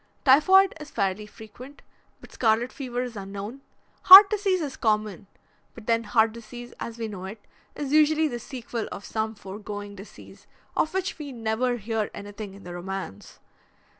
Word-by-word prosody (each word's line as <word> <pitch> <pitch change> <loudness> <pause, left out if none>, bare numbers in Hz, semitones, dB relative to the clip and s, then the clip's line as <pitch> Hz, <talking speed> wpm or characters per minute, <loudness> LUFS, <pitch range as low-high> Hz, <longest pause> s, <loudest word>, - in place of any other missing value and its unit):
Typhoid 375 +8 +6
is 300 - -9
fairly 200 0 -2
frequent, 245 +6 -13 0.4
but - - -15
scarlet 230 +1 +1
fever 250 -3 -4
is 245 -2 -7
unknown. 200 +6 -7 0.4
Heart 390 +2 +11
disease 400 -3 +1
is 290 -5 -4
common, 210 -4 -1 0.5
but - - -12
then 230 0 +1
heart 220 +1 +2
disease, 240 +1 -10
as 230 0 -6
we 225 -1 -4
know 195 -3 -8
it, 210 +3 -8 0.4
is 285 -1 -4
usually 310 +1 +4
the 240 -4 -5
sequel 235 -2 -6
of 200 - -8
some 220 0 -3
foregoing 205 +1 -8
disease, 200 +1 -14 0.3
of 315 - 0
which 380 -2 -2
we 290 -2 -7
never 240 +1 -1
hear 220 -1 -3
anything 205 -1 -8
in 200 - -14
the 175 - -8
romance. 180 - -7
225 Hz, 165 wpm, -25 LUFS, 205-270 Hz, 0.5 s, Heart